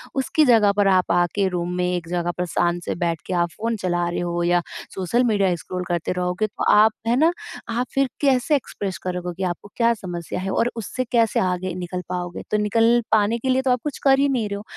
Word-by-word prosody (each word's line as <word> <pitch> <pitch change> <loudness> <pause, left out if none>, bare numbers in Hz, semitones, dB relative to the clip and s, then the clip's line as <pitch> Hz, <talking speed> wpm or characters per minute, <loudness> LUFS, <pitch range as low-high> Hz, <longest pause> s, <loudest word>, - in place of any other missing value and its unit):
उसकी 275 +3 +2
जगह 225 -5 +5
पर 205 -1 +4
आप 185 -2 +3
आके 175 +3 +2
रूम 175 -1 -3
में 180 0 0
एक 180 -2 -2
जगह 175 0 -1
पर 180 - -1
शांत 175 0 0
से - - -3
बैठ 165 -3 -1
के - - -4
आप 175 -1 +1
फ़ोन 230 +2 -1
चला 175 -3 -1
रहे 175 - -3
हो 175 0 -2
या 175 0 +3 0.3
सोशल 195 +7 +1
मीडिया 200 -6 +2
स्क्रॉल 180 +2 -5
करते 175 -2 -1
रहोगे, 180 +3 -1
तो 205 - -6
आप 215 +1 +6 0.2
है 235 - +3
ना। 320 +4 +4 0.4
आप 240 +2 -1
फ़िर 275 -1 +2
कैसे 275 +1 +3
एक्सप्रेस 200 -8 -4
करोगे 180 0 -4
आपको 180 +3 -4
क्या 235 -1 +3
समस्या 175 -5 -5
है, 195 +1 -3
और 240 +4 +1
उससे 230 +3 -3
कैसे 230 -2 +3
आगे 185 0 -1
निकल 180 0 -4
पाओगे। 175 -1 -4
तो 210 - +3
निकल 230 +3 +3
पाने 220 +2 +3
के 260 +3 -3
लिए 260 +1 +3
तो 265 -1 +1
आप 250 -1 +1
कुछ 295 -3 -4
कर 270 -1 +5
ही 280 0 +3
नहीं 245 -6 0
रहे 200 - -3
हो, 205 - -8
195 Hz, 230 wpm, -22 LUFS, 175-235 Hz, 0.4 s, आप